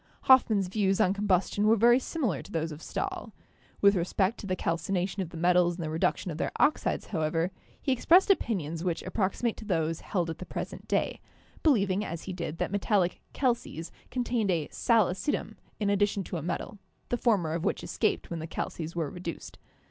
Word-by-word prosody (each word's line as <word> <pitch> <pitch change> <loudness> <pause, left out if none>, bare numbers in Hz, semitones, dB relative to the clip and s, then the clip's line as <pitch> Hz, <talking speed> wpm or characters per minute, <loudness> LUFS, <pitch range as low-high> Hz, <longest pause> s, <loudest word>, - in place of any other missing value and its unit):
Hoffmann's 220 -7 +5
views 195 0 +1
on 185 - +4
combustion 205 +1 +1
were 225 - +6
very 240 +3 +5
similar 250 - -2
to - - -13
those 160 0 -1
of 150 +1 -8
»Stahl. - - -4 0.5
With 200 0 +7
respect 190 +4 0
to 200 - -7
the 185 - 0
calcination 180 +3 -1
of 180 - -4
the 170 - -9
metals 175 +1 +3
and 170 - -5
the 155 - -3
reduction 165 +2 0
of 155 - -6
their - - -1
oxides, 305 - +1
however, 165 +2 0 0.3
he 270 - -1
ex 260 - -1
pressed 370 +4 +7
opinions 170 - -1
which 175 -3 -1
approximate 200 +4 -1
to 220 - -9
those 165 -4 0
held 175 -4 -1
at 160 - -8
the 185 - -6
present - - -6
day, - - 0 0.4
believing, 205 - +3
as 165 -4 -5
he 190 - -5
did, 170 -3 -4
that - - -2
metallic 200 -3 +1
'calces' 235 - -1 0.2
con 250 -1 -1
tained 235 -4 0
a 165 -5 +1
'sal 230 -4 +3
acidum' 190 +11 -2 0.3
in 205 -2 +1
addition 200 0 +1
to 175 - -5
a - - -4
metal, 180 +5 -4 0.3
the - - +1
former 200 -10 +1
of 165 0 -2
which 200 - -1
escaped 215 - -1
when 170 - -3
the 160 - -5
'calces' 165 0 -4
were 160 -4 -2
reduced. 175 -2 -7
185 Hz, 200 wpm, -29 LUFS, 170-215 Hz, 0.5 s, With